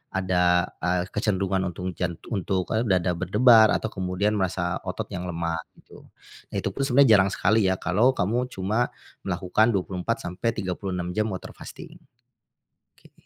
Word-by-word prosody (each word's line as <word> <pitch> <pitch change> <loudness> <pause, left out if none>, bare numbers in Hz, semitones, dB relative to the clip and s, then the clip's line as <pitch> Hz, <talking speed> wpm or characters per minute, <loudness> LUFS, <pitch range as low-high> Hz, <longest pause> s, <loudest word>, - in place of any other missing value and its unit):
ada, 90 -1 +2
eee, 90 0 0
kecenderungan 95 -3 0
untung 90 +1 -5
jan 90 -1 -3 0.2
untuk, 95 -3 -1
eee, 110 +2 +1
dada 90 -2 +2
berdebar 110 +6 +5
atau 110 - -3
kemudian 95 +3 -1
merasa 90 -2 -1
otot - - -4
yang 90 0 -5
lemah 85 -1 -2 0.2
gitu. - - -17 0.4
Itu - - -3
pun 135 - -2
sebenarnya 125 -4 +6
jarang 95 0 +2
sekali 105 +2 +2
ya 95 - +2
kalau 110 +9 +2
kamu 115 +6 0
cuma, 110 +1 -1 0.4
melakukan 110 +6 +1
24-36 95 -1 -3
jam 110 - +2
water 95 - -7
fasting. - - -11 1.0
Oke. - - -21
95 Hz, 140 wpm, -25 LUFS, 90-110 Hz, 1.0 s, sebenarnya